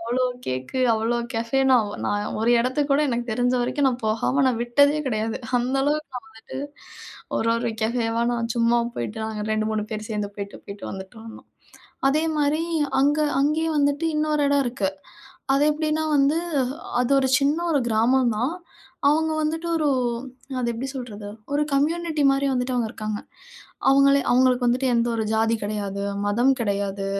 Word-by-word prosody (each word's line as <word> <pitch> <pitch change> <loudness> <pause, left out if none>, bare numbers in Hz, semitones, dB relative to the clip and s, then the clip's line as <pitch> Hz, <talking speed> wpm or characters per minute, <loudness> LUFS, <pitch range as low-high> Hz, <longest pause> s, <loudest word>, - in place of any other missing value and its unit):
அவ்வளோ 245 +3 0 0.2
கேக்கு, 130 - -3
அவ்வளோ 225 +2 0 0.2
கஃபே. 230 +4 0
நான் 235 -5 +4 0.2
நான் 205 0 -2
ஒரு 230 - +2
இடத்துக்கு 275 +4 -1
கூட 280 - +3
எனக்கு 240 -1 -2
தெரிஞ்ச 245 +2 +1
வரைக்கும் 275 +2 +1
நான் 250 -2 -3
போகாம 240 +5 +1
நான் 235 -2 -1
விட்டதே 285 +5 +3
கிடையாது. 220 -2 -1 0.2
அந்த 250 +2 -1
அளவுக்கு 300 +1 0 0.2
நான் 220 - -20
வந்துட்டு 225 - -8 0.8
ஒரு 230 - +1
ஒரு 235 0 -1
கஃபேவா 230 0 0
நான் 235 -1 -2
சும்மா 235 0 +3
போய்ட்டு, 220 -2 -4
நாங்க 215 -1 -4
2 215 0 0
3 210 -1 -1
பேர் 215 +1 -5
சேர்ந்து 210 -1 -2
போய்ட்டு 200 0 -7
போய்ட்டு 200 0 -7
வந்துட்டிருந்தோம். 220 +4 -10 0.6
அதேமாரி 305 +1 +1 0.4
அங்க 290 +2 +3 0.2
அங்கயும் 315 +2 +1
வந்துட்டு 285 +3 +1
இன்னொரு 300 -1 +1
இடம் 285 -1 +3
இருக்கு. 235 -5 -1 0.6
அது 275 +1 +3
எப்படின்னா 310 +1 -1
வந்து, 280 +3 +3 0.6
அது 250 +2 0
ஒரு 265 -1 +2
சின்ன 285 +2 +2
ஒரு 285 -4 +2
கிராமம் 235 +3 +3
தான். 250 +8 0 0.6
அவங்க 315 +2 +2
வந்துட்டு 325 +2 -2
ஒரு 305 -2 +1 0.7
அது 240 -1 -1
எப்படி 250 +4 -4
சொல்றது, 215 -6 -7 0.2
ஒரு 295 +1 +2
கம்யூனிட்டி 315 +2 0
மாரி 275 +1 +1
வந்துட்டு 250 0 -1
அவங்க 235 -2 0
இருக்காங்க. 215 -1 -4 0.7
அவங்களே 275 +1 +5
அவங்களுக்கு 250 0 +3
வந்துட்டு 255 +2 +2
எந்த 235 0 +2
ஒரு 220 -1 -1
ஜாதி 225 +1 +2
கிடையாது, 200 -1 -3 0.2
மதம் 240 +6 +3
கிடையாது, 200 -2 -2
245 Hz, 160 wpm, -24 LUFS, 220-285 Hz, 0.8 s, அவங்களே